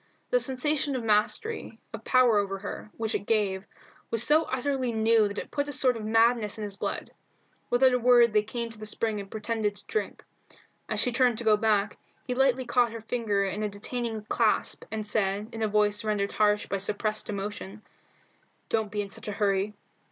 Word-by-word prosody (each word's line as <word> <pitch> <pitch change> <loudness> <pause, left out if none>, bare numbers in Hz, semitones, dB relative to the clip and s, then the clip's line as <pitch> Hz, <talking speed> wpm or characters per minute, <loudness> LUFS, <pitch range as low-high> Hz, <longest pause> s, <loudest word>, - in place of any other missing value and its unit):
The - - +4
sensation 285 - 0
of 250 - -3
mastery, 220 - 0 0.2
of - - -7
power 245 -4 +4
over 195 -1 -2
her, 200 +2 -7
which 225 -1 -2
it 205 - -3
gave, 200 -4 +1 0.4
was 230 0 +2
so 310 +4 +4
utterly 260 -1 -1
new 220 -1 +3
that 205 0 -7
it - - -5
put 285 0 -1
a - - -3
sort 255 -2 +3
of 225 - -6
madness 225 0 +2
in 215 - -5
his 205 -1 -3
blood. - - -4 0.6
Without 255 +1 +4
a 250 - +2
word 240 -2 +5
they 210 - +5
came 230 +2 -5
to 220 - -10
the 215 - -5
spring 215 0 -1
and 200 -1 -8
pretended 215 -1 -2
to - - -11
drink. 435 - -3 0.7
As - - -1
she 250 - +2
turned 245 -1 +2
to 235 - -3
go 215 -1 +5
back, 210 -1 +1 0.3
he 250 - -2
lightly 260 0 +2
caught 240 -1 +2
her 230 - -6
fingers 210 -4 -1
in 210 - -4
a 210 - -1
detaining 220 +2 -4
clasp, 220 -1 0
and 220 -1 -4
said, 205 0 -1
in 225 - -6
a 220 - +2
voice 210 0 +1
rendered 205 -2 -1
harsh 210 -1 +2
by 200 - -2
suppressed 210 +2 -2
emotion 205 0 -5 0.9
"Don't 220 -2 0
be 205 -1 -1
in 200 - -9
such - - -5
a - - -2
hurry. 200 0 0
220 Hz, 205 wpm, -27 LUFS, 210-245 Hz, 0.9 s, word